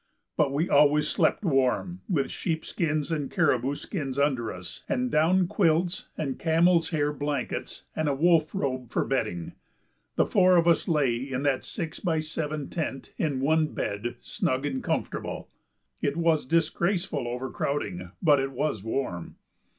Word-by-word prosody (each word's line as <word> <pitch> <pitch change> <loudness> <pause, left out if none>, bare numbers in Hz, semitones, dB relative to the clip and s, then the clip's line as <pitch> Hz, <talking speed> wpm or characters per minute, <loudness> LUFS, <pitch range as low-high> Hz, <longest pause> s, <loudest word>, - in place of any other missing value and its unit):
But 145 -3 +2
we 150 +5 0
always 150 +1 +4
slept 210 - +1
warm; 145 +5 +1
with 150 -8 0
sheep 160 -2 -2
skins 155 -2 -1
and 145 -4 -1
caribou 135 0 +1
skins 140 -6 -4
under 135 -5 +1
us, 90 -1 -9
and 250 -2 0
down 180 +3 +4
quilts 175 0 +1
and 135 -4 -3
camel's 165 +1 +3
hair 150 -3 0
blankets 145 -2 -3
and 155 -1 0
a 140 - +1
wolf 160 +2 +3
robe 130 - -2
for - - 0
bedding, 105 -10 -2 0.6
the - - +3
four 185 -2 +5
of 170 0 +3
us 170 - +3
lay 145 -8 +2
in 130 +1 -3
that 140 -2 +1
six 160 -2 -5
by 165 -4 0
seven 155 -2 -3
tent, 155 -5 -4
in 140 -5 0
one 155 +2 +3
bed, 105 +4 -3
snug 130 +2 -1
and 135 -2 -2
comfortable. - - -3 0.5
It 140 +2 0
was 165 -5 +2
disgraceful 170 -1 0
overcrowding, 125 -6 -3
but 150 -4 +5
it 135 0 -2
was 130 -7 -1
warm. 110 -7 -3
150 Hz, 155 wpm, -27 LUFS, 135-165 Hz, 0.6 s, four